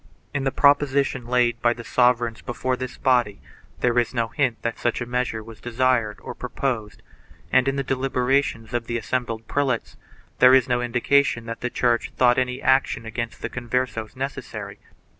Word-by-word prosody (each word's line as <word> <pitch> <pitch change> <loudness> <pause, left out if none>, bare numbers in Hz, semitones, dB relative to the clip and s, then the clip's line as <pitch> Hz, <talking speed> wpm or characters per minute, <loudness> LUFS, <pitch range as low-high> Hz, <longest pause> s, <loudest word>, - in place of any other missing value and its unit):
In 140 -1 -1
the 135 - +1
propositions 140 -3 +2
laid 120 -1 +1
by 120 0 +3
the 120 - -9
sovereigns 120 -1 +2
before 130 +1 -2
this 130 0 -6
body 120 -6 +2 0.4
there 125 0 +3
is 120 +1 -1
no 115 -1 0
hint 135 -4 0
that 115 -1 -3
such 120 - 0
a 120 - -3
measure 120 -2 -2
was 110 -1 -13
desired 120 -3 +1
or - - -6
proposed 120 -4 -4 0.5
and, 130 0 +4
in 135 - +1
the 140 - -1
deliberations 130 -2 0
of 120 -1 -2
the 120 - -1
assembled 115 -1 -3
prelates, 135 -5 -1 0.4
there 130 +1 +8
is 130 -3 +4
no 120 -1 +1
indication 120 +1 +2
that 115 0 -6
the 125 - -1
Church 120 -1 0
thought 125 0 +4
any 125 +1 -2
action 130 -3 +2
against 115 +1 -5
the 115 - -2
Converses 120 -3 -3
necessary. 135 +1 -6
125 Hz, 175 wpm, -23 LUFS, 115-130 Hz, 0.5 s, there